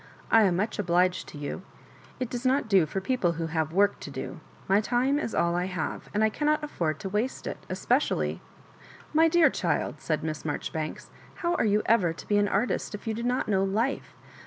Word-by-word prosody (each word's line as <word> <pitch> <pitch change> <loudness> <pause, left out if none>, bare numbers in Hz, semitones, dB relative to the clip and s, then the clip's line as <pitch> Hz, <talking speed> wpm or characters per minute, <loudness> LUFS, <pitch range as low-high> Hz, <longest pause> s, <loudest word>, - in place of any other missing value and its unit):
I 225 - +7
am 180 -3 +2
much 210 +5 -1
obliged 180 -1 +2
to - - -10
you. 145 +5 -5 0.6
It 255 -2 -3
does 245 0 -4
not 260 -1 +2
do 190 -7 +4
for 195 - -2
people 190 -4 0
who 165 0 -3
have 160 -1 -1
work 200 +3 +3
to - - -7
do. 135 +2 -6 0.3
My 195 +2 +4
time 255 +5 +1
is 235 - -3
all 170 0 +2
I 180 +1 0
have, 180 -4 -4
and 210 +1 +1
I 220 - +4
cannot 300 +4 +1
af 300 - -5
ford 155 -3 -1
to 200 - -4
waste 215 +6 -2
it, - - -5
especially - - 0 0.2
" - - -23
" - - -21
My 320 +2 +6
dear 330 0 +5
child," - - -1
said 155 -2 -1
Miss 155 -1 -4
Marjoribanks, 155 +1 -4 0.3
how 345 - +2
are 350 - +1
you 210 0 +2
ever 185 -8 +3
to - - -11
be 205 0 +3
an 205 - +3
artist 210 +1 -1
if 205 - -10
you 225 - -1
do 225 - -4
not 245 +2 0
know 195 -2 +2
life? 220 +8 -1
205 Hz, 225 wpm, -27 LUFS, 170-245 Hz, 0.6 s, I